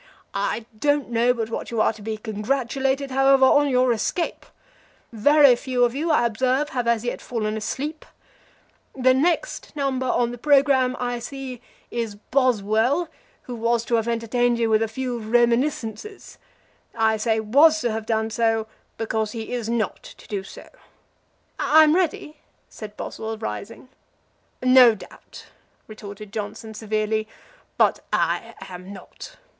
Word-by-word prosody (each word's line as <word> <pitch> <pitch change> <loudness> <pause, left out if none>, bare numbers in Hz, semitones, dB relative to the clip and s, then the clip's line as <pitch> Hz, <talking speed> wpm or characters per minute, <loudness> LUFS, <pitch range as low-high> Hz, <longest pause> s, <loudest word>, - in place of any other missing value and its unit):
I 200 +3 -2
don't 290 -1 +1
know 235 +1 +3
but 230 -2 -3
what - - -4
you 230 - -3
are 215 - +3
to 215 - -14
be 220 +1 -4
congratulated, 265 +5 -2
however, 270 0 +5
on 290 +2 +4
your 255 -1 +3
escape. 330 +10 -3 0.7
Very 285 +3 +6
few 250 0 -1
of 240 -1 +2
you, 310 +5 -2
I 240 - +3
observe, 255 +5 0
have 245 -4 -3
as 235 0 +1
yet 240 - -3
fallen 215 -3 -3
asleep. 260 +9 -4 0.9
The 260 -1 +4
next 340 - -1
number 270 -3 -1
on 240 -1 +1
the 245 - -8
programme, 270 -2 +3
I 245 -1 -2
see, 260 -1 -7 0.3
is 230 -3 -3
Boswell, 250 - +1 0.3
who 250 - -7
was 235 0 0
to - - -4
have 225 0 -1
entertained 235 +1 0
you 230 -1 0
with 215 0 +4
a 225 - +1
few 245 +2 -4
reminiscences; 240 - -1 0.6
I 220 -1 +2
say 220 0 0
was 290 +9 +5
to 240 - 0
have 220 0 -4
done 220 -1 0
so, 225 -1 +1 0.3
because 220 -1 -2
he 225 -2 -6
is 235 -2 -3
not 230 -4 -1
to - - -14
do 200 -2 -3
so." 190 - -12 0.9
"I'm 310 0 +5
ready," 315 -4 -1 0.3
said 210 -1 -10
Boswell, 220 0 -5
rising. 205 - -7 0.8
"No 255 -3 +7
doubt," 195 - -13 0.4
retorted 210 -1 -10
Johnson, 220 +1 -6
severely, 215 0 -2 0.5
"but - - +3
I - - -1
am 180 +1 -9
not. 200 - -11
235 Hz, 150 wpm, -23 LUFS, 220-265 Hz, 0.9 s, No